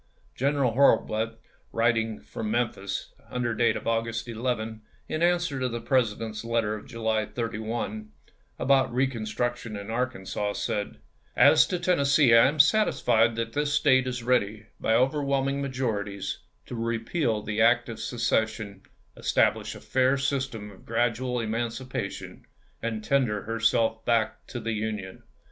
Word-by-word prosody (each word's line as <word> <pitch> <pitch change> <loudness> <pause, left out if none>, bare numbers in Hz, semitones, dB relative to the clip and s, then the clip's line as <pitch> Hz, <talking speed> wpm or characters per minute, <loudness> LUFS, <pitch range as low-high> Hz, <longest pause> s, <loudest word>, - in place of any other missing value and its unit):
General 140 -2 +1
Hurlbut, 115 -3 +2 0.3
writing 115 -1 +1
from 110 - -5
Memphis, 105 -4 -2 0.2
under 125 -2 -1
date 115 -1 +2
of - - -6
August 115 +1 -1
11, 115 -2 -3 0.3
in 155 - -3
answer 175 -5 +2
to 130 -1 0
the 120 0 -4
Presi 115 -3 +1
dent's 110 -1 -5
letter 115 -2 0
of 105 - -7
July 110 -3 -1
31, 110 -2 -4 0.5
about 135 -2 +3
reconstruction 120 -2 -2
in 100 +2 -7
Arkansas, 110 -4 -2
said: 105 -4 -3 0.4
"As - - +6
to 180 - -1
Tennessee, 140 -7 +3
I 115 +2 +8
am 150 +3 -2
satisfied 120 - +4
that 115 0 -3
this 145 0 0
State 130 -3 +4
is 125 -1 -3
ready, 110 -4 +1
by 110 - +2
overwhelming 140 +1 +1
majori 125 -6 -1
ties, 100 -1 -4 0.3
to - - -9
repeal 115 +1 -1
the 110 +1 -1
act 120 +2 +4
of 115 -2 -7
secession, 110 -4 -1 0.3
establish - - +1
a - - -9
fau" 130 +1 +2
system 135 -6 -2
of 95 - -16
gradual 120 +2 0
emancipation, 115 +3 -4 0.3
and 110 -2 -3
tender 115 -6 +1
herself 115 0 +1
back 110 -2 0
to 120 - -5
the 115 0 -2
Union. 105 -3 -4
115 Hz, 140 wpm, -27 LUFS, 110-130 Hz, 0.5 s, I